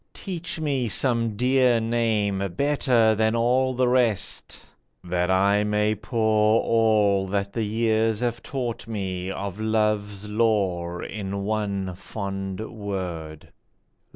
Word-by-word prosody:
Teach 180 Hz, -1 st, -4 dB
me 140 Hz, -6 st, 0 dB
some 115 Hz, -2 st, +1 dB
dear 125 Hz, 0 st, +3 dB
name 105 Hz, -5 st, 0 dB
Better 130 Hz, -6 st, +3 dB
than 110 Hz, +1 st, +1 dB
all 125 Hz, +2 st, +2 dB
the 125 Hz, 0 st, +2 dB
rest, 120 Hz, -5 st, 0 dB, 0.4 s
that 90 Hz, 0 st, -1 dB
I 100 Hz, +2 st, +3 dB
may 105 Hz, 0 st, +1 dB
pour 110 Hz, 0 st, +2 dB
All 105 Hz, -4 st, +3 dB
that 100 Hz, +1 st, -2 dB
the 115 Hz, -, -2 dB
years 110 Hz, 0 st, +1 dB
have 120 Hz, -1 st, -1 dB
taught 120 Hz, -5 st, -4 dB
me 95 Hz, -4 st, -4 dB
of 100 Hz, 0 st, -5 dB
love's 105 Hz, -2 st, 0 dB
lore 100 Hz, -6 st, 0 dB
In 100 Hz, -1 st, -4 dB
one 100 Hz, -3 st, -2 dB
fond 95 Hz, +1 st, -5 dB
word. 90 Hz, -7 st, -6 dB
105 Hz, 120 wpm, -24 LUFS, 100-115 Hz, 0.4 s, dear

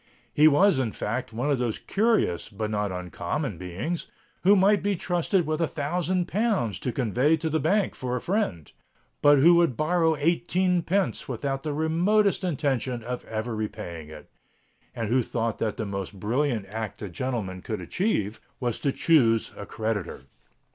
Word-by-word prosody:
He 150 Hz, +1 st, +6 dB
was, 155 Hz, +1 st, +5 dB
in 120 Hz, -5 st, -1 dB
fact, 115 Hz, +4 st, -3 dB
one 125 Hz, +6 st, -1 dB
of 135 Hz, -, +1 dB
those 120 Hz, -3 st, -1 dB
curious, 205 Hz, -, +1 dB
but 110 Hz, 0 st, -4 dB
not 105 Hz, -2 st, -1 dB
uncommon 90 Hz, -, -4 dB
beings, 95 Hz, -, -4 dB, 0.3 s
who 200 Hz, +3 st, +6 dB
might 200 Hz, +1 st, +4 dB
be 200 Hz, 0 st, 0 dB
trusted 175 Hz, +1 st, 0 dB
with 155 Hz, +1 st, -1 dB
a 165 Hz, -, +2 dB
thousand 175 Hz, +4 st, -1 dB
pounds 200 Hz, -, 0 dB
to 125 Hz, -, -2 dB
convey 130 Hz, +6 st, +2 dB
to 160 Hz, 0 st, -2 dB
the 160 Hz, -, +1 dB
bank 195 Hz, +6 st, +1 dB
for 125 Hz, -1 st, -3 dB
a -, -, -1 dB
friend, 120 Hz, -, -2 dB, 0.5 s
but 145 Hz, 0 st, +6 dB
who 165 Hz, +6 st, +7 dB
would 170 Hz, -8 st, +3 dB
borrow 160 Hz, 0 st, +2 dB
eighteen 175 Hz, +3 st, +1 dB
pence 185 Hz, +3 st, -1 dB
without 135 Hz, +1 st, -3 dB
the 150 Hz, 0 st, -3 dB
remotest 185 Hz, +7 st, +2 dB
intention 135 Hz, -7 st, -1 dB
of 125 Hz, +1 st, -4 dB
ever 110 Hz, +1 st, -3 dB
repaying 85 Hz, -7 st, -5 dB
it, 75 Hz, -1 st, -12 dB, 0.6 s
and 115 Hz, -3 st, -3 dB
who 130 Hz, +2 st, +3 dB
thought 115 Hz, -1 st, -2 dB
that 110 Hz, -2 st, -1 dB
the 110 Hz, -, -2 dB
most 100 Hz, 0 st, -5 dB
brilliant 115 Hz, +1 st, 0 dB
act 110 Hz, +1 st, -6 dB
a -, -, -3 dB
gentleman 95 Hz, -2 st, -4 dB
could 110 Hz, +2 st, -4 dB
achieve 110 Hz, -, -1 dB, 0.2 s
was 120 Hz, -3 st, -2 dB
to 140 Hz, -, 0 dB
chouse 120 Hz, -9 st, +3 dB
a 100 Hz, -, -8 dB
creditor. 110 Hz, -, -3 dB
135 Hz, 170 wpm, -26 LUFS, 110-170 Hz, 0.6 s, who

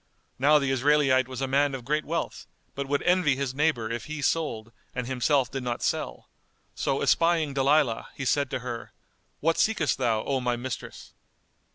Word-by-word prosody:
Now 150 Hz, +3 st, +5 dB
the 140 Hz, -2 st, 0 dB
Israelite 135 Hz, -1 st, +3 dB
was 130 Hz, 0 st, -6 dB
a 135 Hz, -, 0 dB
man 140 Hz, +1 st, +2 dB
of 125 Hz, -3 st, -8 dB
great 150 Hz, +3 st, 0 dB
wealth, 165 Hz, +3 st, -3 dB, 0.3 s
but 140 Hz, 0 st, -4 dB
would 145 Hz, +1 st, 0 dB
envy 180 Hz, -6 st, +3 dB
his 135 Hz, -1 st, -2 dB
neighbour 135 Hz, -6 st, 0 dB
if 115 Hz, -1 st, -4 dB
he 155 Hz, -1 st, -5 dB
sold 115 Hz, -10 st, -1 dB, 0.2 s
and 125 Hz, -1 st, -2 dB
himself 130 Hz, 0 st, +1 dB
did 135 Hz, -, -3 dB
not 120 Hz, -1 st, -3 dB
sell; -, -, -2 dB, 0.5 s
so -, -, -1 dB
espying 165 Hz, -4 st, +2 dB
Dalilah, 135 Hz, -3 st, +2 dB
he 135 Hz, -, -5 dB
said 140 Hz, +1 st, +1 dB
to -, -, -2 dB
her, 120 Hz, -2 st, -6 dB, 0.5 s
"What 165 Hz, +2 st, +1 dB
seekest 170 Hz, -, +1 dB
thou, 110 Hz, -2 st, +1 dB
O 135 Hz, -1 st, 0 dB
my 125 Hz, -1 st, 0 dB
mistress?" 120 Hz, 0 st, -7 dB
135 Hz, 180 wpm, -27 LUFS, 125-150 Hz, 0.5 s, Now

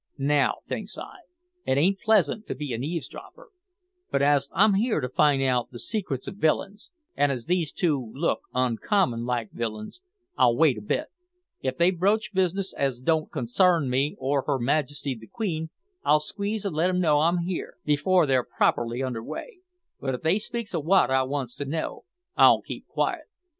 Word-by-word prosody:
Now, 140 Hz, 0 st, +1 dB
thinks -, -, -5 dB
I, -, -, -8 dB, 0.5 s
it 130 Hz, -, +1 dB
ain't 190 Hz, +7 st, +2 dB
pleasant 215 Hz, -1 st, +2 dB
to -, -, -3 dB
be 140 Hz, -1 st, -4 dB
an 115 Hz, +2 st, -3 dB
eavesdropper, 175 Hz, -, -7 dB, 0.6 s
but 140 Hz, -, +1 dB
as 140 Hz, -1 st, +3 dB
I'm 215 Hz, -, +4 dB
here 215 Hz, 0 st, +1 dB
to 125 Hz, -, -2 dB
find 140 Hz, +1 st, +3 dB
out 125 Hz, -2 st, +1 dB
the 120 Hz, -, -10 dB
secrets 175 Hz, -, -3 dB
of 200 Hz, -, -7 dB
villains, 200 Hz, -, -1 dB, 0.3 s
and 145 Hz, 0 st, +2 dB
as 125 Hz, -4 st, -4 dB
these 170 Hz, -2 st, 0 dB
two 140 Hz, -10 st, -1 dB
look 160 Hz, +5 st, 0 dB
uncommon 125 Hz, -, +1 dB
like 120 Hz, -3 st, -2 dB
villains, 110 Hz, -, -5 dB, 0.3 s
I'll 120 Hz, -1 st, +4 dB
wait 140 Hz, -8 st, +4 dB
a -, -, -11 dB
bit; 295 Hz, -, -2 dB, 0.5 s
if 130 Hz, -1 st, -2 dB
they 170 Hz, +2 st, +4 dB
broach 200 Hz, +5 st, 0 dB
business 190 Hz, +1 st, 0 dB
as 135 Hz, -3 st, -1 dB
don't 155 Hz, +4 st, +1 dB
consarn 155 Hz, +3 st, +2 dB
me 135 Hz, +4 st, +1 dB
or 135 Hz, +1 st, 0 dB
her 140 Hz, -2 st, +1 dB
Majesty 140 Hz, +2 st, -1 dB
the 110 Hz, -2 st, -12 dB
Queen, 160 Hz, -8 st, -3 dB, 0.3 s
I'll 150 Hz, -, +4 dB
sneeze 205 Hz, +6 st, -3 dB
an' 195 Hz, -, -2 dB
let 165 Hz, +4 st, +2 dB
'em 180 Hz, 0 st, 0 dB
know 155 Hz, -4 st, +3 dB
I'm 170 Hz, +3 st, +3 dB
here, 180 Hz, 0 st, -4 dB
before 155 Hz, +4 st, +3 dB
they're 130 Hz, -3 st, +2 dB
properly 120 Hz, +2 st, 0 dB
under 125 Hz, -3 st, -3 dB
weigh; 425 Hz, -, -7 dB, 0.4 s
but 135 Hz, -2 st, -2 dB
if -, -, -8 dB
they 170 Hz, +6 st, +3 dB
speaks 235 Hz, -1 st, -5 dB
of 165 Hz, -4 st, -1 dB
wot 175 Hz, -5 st, +4 dB
I 130 Hz, 0 st, +4 dB
wants 130 Hz, -2 st, -3 dB
to 145 Hz, -, -3 dB
know, 155 Hz, -, -4 dB, 0.3 s
I'll -, -, +6 dB
keep -, -, -8 dB
quiet. -, -, -1 dB
150 Hz, 185 wpm, -26 LUFS, 130-185 Hz, 0.6 s, I'll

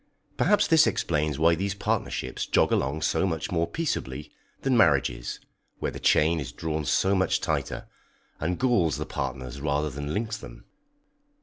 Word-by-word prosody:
Perhaps 205 Hz, -1 st, +3 dB
this 160 Hz, -4 st, +5 dB
explains 75 Hz, -3 st, 0 dB
why 80 Hz, +2 st, +4 dB
these 100 Hz, +4 st, -2 dB
partnerships 100 Hz, -, -2 dB
jog -, -, +3 dB
along 70 Hz, +4 st, 0 dB
so 95 Hz, -, +1 dB
much 80 Hz, -4 st, -3 dB
more 85 Hz, -1 st, +1 dB
peaceably 75 Hz, -, -3 dB, 0.3 s
than 135 Hz, -2 st, +2 dB
marriages, 70 Hz, -, +2 dB, 0.4 s
where -, -, -2 dB
the -, -, -8 dB
chain 80 Hz, +2 st, +3 dB
is 70 Hz, -5 st, -5 dB
drawn 75 Hz, +4 st, -3 dB
so 95 Hz, +7 st, +2 dB
much 95 Hz, -1 st, +2 dB
tighter, -, -, -2 dB, 0.5 s
and 90 Hz, +3 st, -1 dB
galls 110 Hz, -, +2 dB
the -, -, -3 dB
partners 65 Hz, 0 st, -5 dB
rather 75 Hz, 0 st, 0 dB
than 70 Hz, +2 st, -5 dB
links 110 Hz, +3 st, -2 dB
them. -, -, -12 dB
80 Hz, 160 wpm, -26 LUFS, 70-100 Hz, 0.5 s, this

